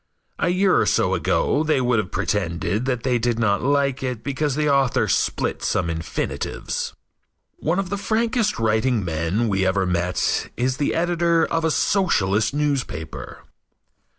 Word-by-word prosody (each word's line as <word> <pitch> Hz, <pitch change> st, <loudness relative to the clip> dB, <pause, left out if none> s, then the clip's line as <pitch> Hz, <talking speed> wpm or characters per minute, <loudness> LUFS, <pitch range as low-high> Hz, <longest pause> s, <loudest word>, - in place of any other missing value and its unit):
A 170 Hz, -, +1 dB
year 185 Hz, +1 st, +3 dB
or -, -, +1 dB
so 95 Hz, -, +2 dB
ago 90 Hz, -, +1 dB
they 155 Hz, -3 st, +2 dB
would 125 Hz, -2 st, +2 dB
have 95 Hz, -4 st, -3 dB
pretended 100 Hz, +1 st, -1 dB
that 125 Hz, -3 st, -1 dB
they 125 Hz, -2 st, +1 dB
did 120 Hz, 0 st, 0 dB
not 105 Hz, -3 st, +1 dB
like 140 Hz, 0 st, +1 dB
it 125 Hz, -4 st, -3 dB
because 140 Hz, 0 st, -1 dB
the 150 Hz, 0 st, 0 dB
author 135 Hz, -3 st, +2 dB
split -, -, 0 dB
some 85 Hz, -2 st, 0 dB
infinitives. 80 Hz, -1 st, -4 dB, 0.6 s
One 165 Hz, +4 st, -1 dB
of 195 Hz, -1 st, -2 dB
the 200 Hz, -, -1 dB
frankest 225 Hz, +1 st, 0 dB
writing 110 Hz, 0 st, +1 dB
men 85 Hz, +8 st, -1 dB
we 95 Hz, -2 st, +1 dB
ever 95 Hz, +1 st, +1 dB
met 90 Hz, 0 st, 0 dB
is 125 Hz, +1 st, 0 dB
the 145 Hz, -, 0 dB
editor 170 Hz, -1 st, +2 dB
of 165 Hz, 0 st, -1 dB
a 160 Hz, -, +2 dB
Socialist 110 Hz, -, +1 dB
newspaper. 140 Hz, -, -3 dB
125 Hz, 155 wpm, -22 LUFS, 95-150 Hz, 0.6 s, year